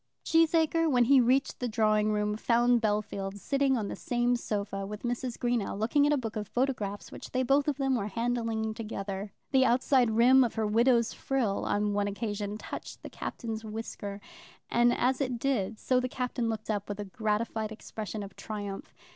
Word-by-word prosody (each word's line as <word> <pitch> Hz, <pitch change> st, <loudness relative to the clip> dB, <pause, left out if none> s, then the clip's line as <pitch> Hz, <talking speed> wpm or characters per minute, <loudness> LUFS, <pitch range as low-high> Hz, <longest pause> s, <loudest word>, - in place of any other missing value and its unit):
Cheesacre, 330 Hz, 0 st, +3 dB
when 250 Hz, -4 st, +4 dB
he 265 Hz, +2 st, +6 dB
reached 255 Hz, +3 st, +2 dB
the 250 Hz, -, -1 dB
drawing 215 Hz, -2 st, +2 dB
room, 210 Hz, 0 st, 0 dB
found 240 Hz, +2 st, +3 dB
Bellfield 205 Hz, -2 st, -1 dB
sitting 275 Hz, +4 st, +1 dB
on 210 Hz, -3 st, -2 dB
the -, -, -4 dB
same 245 Hz, 0 st, 0 dB
sofa 200 Hz, -4 st, -3 dB
with 210 Hz, +1 st, -7 dB
Mrs. 245 Hz, 0 st, -2 dB
Greenow 240 Hz, -5 st, -1 dB
looking 285 Hz, +7 st, +3 dB
at -, -, +2 dB
a 295 Hz, -, +3 dB
book 225 Hz, -4 st, -4 dB
of 210 Hz, -2 st, -3 dB
photographs 230 Hz, -6 st, -2 dB
which -, -, -9 dB
they 255 Hz, 0 st, 0 dB
both 275 Hz, +3 st, +3 dB
of 290 Hz, -3 st, 0 dB
them 270 Hz, -1 st, +1 dB
were 215 Hz, -5 st, 0 dB
handling 225 Hz, 0 st, -1 dB
together. 200 Hz, -3 st, -5 dB, 0.2 s
The 265 Hz, -2 st, +5 dB
outside 255 Hz, -1 st, +3 dB
rim 245 Hz, +4 st, +6 dB
of 235 Hz, -, -2 dB
her 220 Hz, -, 0 dB
widow's 235 Hz, +2 st, +3 dB
frill 245 Hz, -7 st, -1 dB
on 205 Hz, 0 st, 0 dB
one 205 Hz, 0 st, +1 dB
occasion 205 Hz, 0 st, -3 dB
touched -, -, -8 dB
the -, -, -8 dB
Captain's 225 Hz, -2 st, -5 dB
whisker, 215 Hz, -2 st, -6 dB, 0.5 s
and 240 Hz, 0 st, +4 dB
as 255 Hz, +3 st, +1 dB
it 255 Hz, -3 st, -1 dB
did 230 Hz, -5 st, -1 dB
so 255 Hz, +3 st, +1 dB
the 255 Hz, 0 st, -2 dB
Captain 250 Hz, -2 st, -2 dB
looked 220 Hz, 0 st, -3 dB
up 205 Hz, -1 st, -3 dB
with 205 Hz, 0 st, -4 dB
a 205 Hz, -, -3 dB
gratified 215 Hz, +1 st, -2 dB
expression 215 Hz, -1 st, -6 dB
of 195 Hz, -1 st, -10 dB
triumph. 205 Hz, -2 st, -6 dB
225 Hz, 190 wpm, -29 LUFS, 210-250 Hz, 0.5 s, he